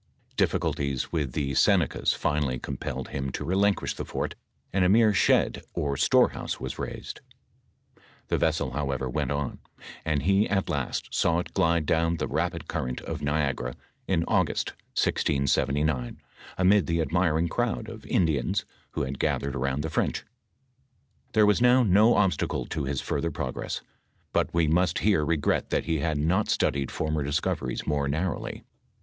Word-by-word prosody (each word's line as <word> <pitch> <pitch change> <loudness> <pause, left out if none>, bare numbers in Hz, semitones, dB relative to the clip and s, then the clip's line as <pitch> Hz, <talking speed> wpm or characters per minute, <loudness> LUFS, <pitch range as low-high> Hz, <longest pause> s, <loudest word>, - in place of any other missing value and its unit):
DiflSculties 70 -2 0
wfth 75 -7 -2
the 70 -1 -1
Senecas - - +3
finally 70 -4 0
compelled 65 +2 -5
him 70 -1 -3
to 75 - -4
relin 100 +4 +3
quish - - -4
the - - -4
fort, - - -3 0.4
and 95 -1 +3
a 90 - +4
mere 110 +1 +5
shed - - +3
or 70 -1 -1
storehouse - - +2
was 65 - -5
raised. - - -6 1.1
The - - +1
vessel, - - +1
however, 70 -1 -2
went 70 +1 -1
on, 70 -2 -2 0.4
and 75 -3 0
he 100 +4 +3
at 95 -1 0
last - - -3
saw 85 0 +2
it 85 - -4
glide 85 -3 +2
down 80 +2 +2
into 80 - -1
the - - -7
rapid - - -1
current 65 0 -3
of - - -5
Niagara 70 -4 -1 0.3
in - - +2
August, - - +1 0.3
1679, 70 -1 +1 0.4
amid 95 -2 +4
the 85 0 +1
admiring 85 0 +1
crowd 115 +3 -1
of 110 -1 -9
Indians 80 -8 +1 0.3
who - - -1
had 65 +1 -4
gathered 70 -1 0
around 70 +3 -1
the 80 - -2
French. - - -1 1.1
Tliere 110 -1 +5
was 105 +2 +3
now 125 +1 +6
no 105 +3 +5
obstacle 95 -6 +1
to 75 -3 -3
his 70 -1 -2
further 85 - -1
progress, 75 - -4 0.5
but - - +1
we 85 -2 +2
ranet 90 +2 +2
here 100 -7 +3
regret 75 -1 0
that - - 0
he 80 -1 0
had 80 0 0
not 85 +8 +1
studied 70 -1 +1
former 80 -1 -1
discoveries 70 -3 -2
more 70 -2 0
narrowly. 80 +6 -2
80 Hz, 160 wpm, -27 LUFS, 70-90 Hz, 1.1 s, now